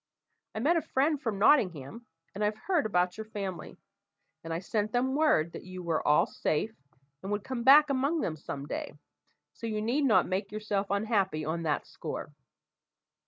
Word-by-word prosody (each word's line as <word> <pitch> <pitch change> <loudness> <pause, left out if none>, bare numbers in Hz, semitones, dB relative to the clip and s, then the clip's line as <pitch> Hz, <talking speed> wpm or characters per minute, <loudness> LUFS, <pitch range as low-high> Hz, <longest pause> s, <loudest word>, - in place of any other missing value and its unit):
I - - -2
met 330 +7 +3
a - - +1
friend 290 +1 0
from 225 -6 -2
Nottingham, 200 - +2 0.3
and 205 +2 -3
I've 210 +1 0
heard 345 - 0
about 180 0 0
your 220 - -4
family; 200 -4 -6 0.7
and 165 - -6
I 165 - -1
sent 210 +4 -2
them 255 +2 +1
word 280 - +3
that - - -8
you 185 -1 -8
were 165 -2 0
all 150 0 +5
safe, 210 +9 -2 0.5
and 195 - -5
would 205 -1 -1
come 255 -2 -4
back 285 +3 +7
among 280 +4 +1
them 160 - -2
some 140 -2 -6
day, - - -5 0.6
so 230 - -6
you 215 -1 -2
need 245 +7 +1
not 225 -5 +4
make 195 +2 -2
yourself 210 -2 -2
unhappy 200 -6 0
on 160 +2 -2
that 155 -3 -1
score." 150 - -7
210 Hz, 180 wpm, -29 LUFS, 180-255 Hz, 0.7 s, back